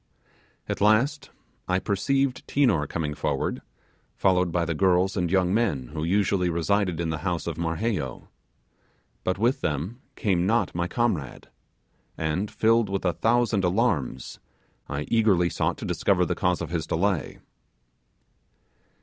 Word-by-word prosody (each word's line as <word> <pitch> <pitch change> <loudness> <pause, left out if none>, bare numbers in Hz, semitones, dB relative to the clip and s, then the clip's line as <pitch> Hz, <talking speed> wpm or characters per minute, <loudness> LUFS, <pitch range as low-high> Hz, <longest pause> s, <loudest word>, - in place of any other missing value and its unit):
At - - -3
last, 130 +7 +2 0.4
I 90 - +2
perceived 130 +7 0
Tinor 120 - +2
coming 75 -1 -3
forward, - - -2 0.5
followed 90 -2 +2
by 85 0 0
the 85 - -1
girls 95 +2 +2
and 90 -3 0
young 95 0 +2
men 100 - 0
who 75 0 -4
usually 95 0 +1
resided 90 +1 0
in 85 -1 -1
the 80 - -3
house 90 0 -2
of 85 - -3
Marheyo; 85 - -2 1.0
but 95 - 0
with 120 +6 +1
them 85 - -3
came 95 -4 +1
not 115 +3 +1
my 85 0 -1
comrade, 90 - -2 0.7
and, 80 +6 -1
filled 115 -1 +2
with 95 -1 -2
a 90 - +2
thousand 115 +2 +1
alarms, 90 - 0 0.5
I 70 - -2
eagerly 100 -7 +3
sought - - -1
to - - -6
discover - - +1
the - - -1
cause 90 -1 0
of - - -5
his 80 -2 -2
delay. 95 -1 -1
90 Hz, 140 wpm, -26 LUFS, 85-110 Hz, 1.0 s, eagerly